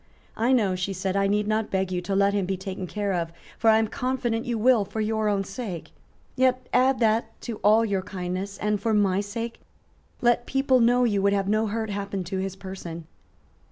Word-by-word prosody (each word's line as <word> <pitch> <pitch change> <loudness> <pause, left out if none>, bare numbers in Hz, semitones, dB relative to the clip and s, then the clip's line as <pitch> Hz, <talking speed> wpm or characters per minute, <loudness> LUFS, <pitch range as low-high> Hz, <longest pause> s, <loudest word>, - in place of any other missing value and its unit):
"I 235 +3 +1
know," 215 -7 +3
she 185 +2 -2
said, 190 +1 -2
"I 195 0 +2
need 210 +1 +1
not 215 0 0
beg 190 -1 -1
you 180 -1 -1
to 195 +2 -2
let 200 +1 +3
him 200 -3 0
be 190 0 -1
taken 190 0 -5
care 205 +1 -2
of; 170 -2 -2 0.3
for 225 - +4
I 220 - +6
am 220 0 +2
confident 245 -1 -2
you 240 -1 -1
will 235 -1 +4
for 205 +3 -6
your 215 0 0
own 200 -1 +1
sake; 195 -4 -6 0.4
yet 255 -1 +2
add 260 +1 +4
that 225 0 +1
to 230 -3 -5
all 215 +3 +4
your 200 -3 0
kindness; 185 0 -5
and, 210 -1 -1
for 220 0 +1
my 195 -2 +3
sake, 230 +3 -5 0.6
let 240 0 +2
people 270 -1 +3
know 245 +1 +4
you 205 -5 +2
would 200 +1 +3
have 195 -1 0
no 215 +2 +2
hurt 220 0 -2
happen 200 -1 -3
to 190 +2 -4
his 190 0 -3
person." 180 -4 -8
205 Hz, 215 wpm, -25 LUFS, 195-230 Hz, 0.6 s, I